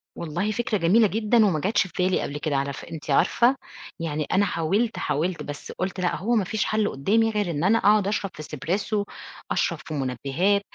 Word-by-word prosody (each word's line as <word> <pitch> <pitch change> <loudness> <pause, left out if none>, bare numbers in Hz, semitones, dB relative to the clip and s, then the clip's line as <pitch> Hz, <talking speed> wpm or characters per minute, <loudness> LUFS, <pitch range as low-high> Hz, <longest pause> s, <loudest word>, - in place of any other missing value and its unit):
والله 170 +6 -2
فكرة 220 0 -1
جميلة 200 +6 +4
جدًا 220 +2 +3
وما 175 -7 +1
جاتش 195 +3 +1
في 170 - -19
بالي 185 0 +2
قبل 145 - -4
كده، 150 -1 -2
على 140 0 -1
ف - - -9
أنتِ 160 -2 -9
عارفة؟ 240 - +4 0.4
يعني 155 -2 -2
أنا 200 +2 +3
حاولت، 200 +7 0
حاولت، 170 +4 -1
بس 145 0 -7
قُلت 185 0 -4
لأ، 180 -1 0
هو 235 +6 0
ما 215 - +3
فيش 215 +3 -1
حل 215 -1 +1
قدّامي 220 +11 +2
غير 205 -4 -1
إن 150 0 -2
أنا 210 +5 +4
أقعد 205 -1 +4
أشرب 200 -2 -1
في 155 - -8
Espresso، 185 +9 -2 0.5
أشرب - - 0
في 155 - -6
منبهات، 140 - 0
185 Hz, 200 wpm, -25 LUFS, 155-210 Hz, 0.5 s, جميلة